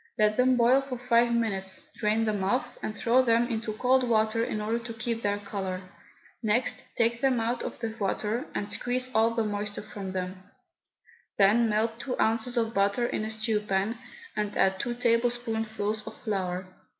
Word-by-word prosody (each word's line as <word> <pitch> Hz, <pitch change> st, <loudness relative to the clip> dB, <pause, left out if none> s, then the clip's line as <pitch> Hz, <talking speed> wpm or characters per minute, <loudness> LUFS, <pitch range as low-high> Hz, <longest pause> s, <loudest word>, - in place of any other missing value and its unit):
Let 215 Hz, -1 st, +3 dB
them 255 Hz, +1 st, +4 dB
boil 245 Hz, +3 st, +5 dB
for 270 Hz, -2 st, -5 dB
five 240 Hz, -1 st, +3 dB
minutes, 200 Hz, -5 st, -1 dB
drain 220 Hz, +1 st, +1 dB
them 210 Hz, -3 st, 0 dB
off, 225 Hz, +7 st, 0 dB
and 215 Hz, -, -4 dB
throw 240 Hz, +2 st, +4 dB
them 235 Hz, -1 st, +3 dB
into 225 Hz, -2 st, -3 dB
cold 255 Hz, +4 st, +3 dB
water 225 Hz, -1 st, +2 dB
in 215 Hz, -, -2 dB
order 220 Hz, +2 st, -1 dB
to 230 Hz, -1 st, -7 dB
keep 230 Hz, 0 st, -2 dB
their 205 Hz, -1 st, 0 dB
colour. 195 Hz, -2 st, -4 dB, 0.6 s
Next 230 Hz, +2 st, +1 dB
take 235 Hz, 0 st, +1 dB
them 265 Hz, -3 st, +3 dB
out 235 Hz, +2 st, -1 dB
of -, -, -5 dB
the 225 Hz, -2 st, -4 dB
water 215 Hz, +6 st, -1 dB
and 205 Hz, -, -2 dB
squeeze 250 Hz, +4 st, -1 dB
all 220 Hz, +1 st, +4 dB
the 230 Hz, -, +2 dB
moisture 205 Hz, -1 st, -3 dB
from 195 Hz, -3 st, -7 dB
them; 185 Hz, 0 st, -4 dB, 1.0 s
then 220 Hz, +4 st, +5 dB
melt 225 Hz, +2 st, 0 dB
two 250 Hz, +1 st, -4 dB
ounces 230 Hz, +3 st, +1 dB
of 225 Hz, -1 st, +1 dB
butter 200 Hz, +4 st, +2 dB
in 215 Hz, -, -2 dB
a 215 Hz, -, -3 dB
stew 220 Hz, 0 st, 0 dB
pan, 210 Hz, +2 st, -1 dB, 0.4 s
and 210 Hz, -1 st, -2 dB
add 190 Hz, 0 st, +3 dB
two 240 Hz, +3 st, -2 dB
tablespoonfuls 225 Hz, -3 st, 0 dB
of -, -, -7 dB
flour. 185 Hz, -4 st, -2 dB
225 Hz, 180 wpm, -28 LUFS, 210-235 Hz, 1.0 s, boil